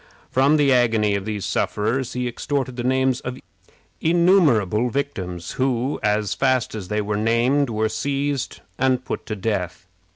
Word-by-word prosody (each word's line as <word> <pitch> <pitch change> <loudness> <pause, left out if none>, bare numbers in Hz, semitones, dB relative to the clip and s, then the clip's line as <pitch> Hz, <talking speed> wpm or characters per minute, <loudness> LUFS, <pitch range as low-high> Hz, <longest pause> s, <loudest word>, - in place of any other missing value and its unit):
From 140 +4 +4
the 140 -3 +4
agony 115 -4 +3
of 100 -1 -2
these 105 -3 -3
sufferers 120 +5 -1
he 125 0 -2
extorted 130 +1 -2
the 120 - -4
names 130 0 +1
of 125 +1 -5 0.6
innumerable 155 - +3
victims, 90 -11 -4
who, 130 +1 -1
as 105 -1 +1
fast 130 -3 +1
as 105 -5 -6
they 105 +2 -1
were 105 0 -2
named, 120 +6 +2
were 110 -1 0
seized 140 +2 -2 0.2
and 130 -1 +1
put - - -5
to 110 - -3
death. 95 -4 -3
125 Hz, 155 wpm, -22 LUFS, 105-135 Hz, 0.6 s, From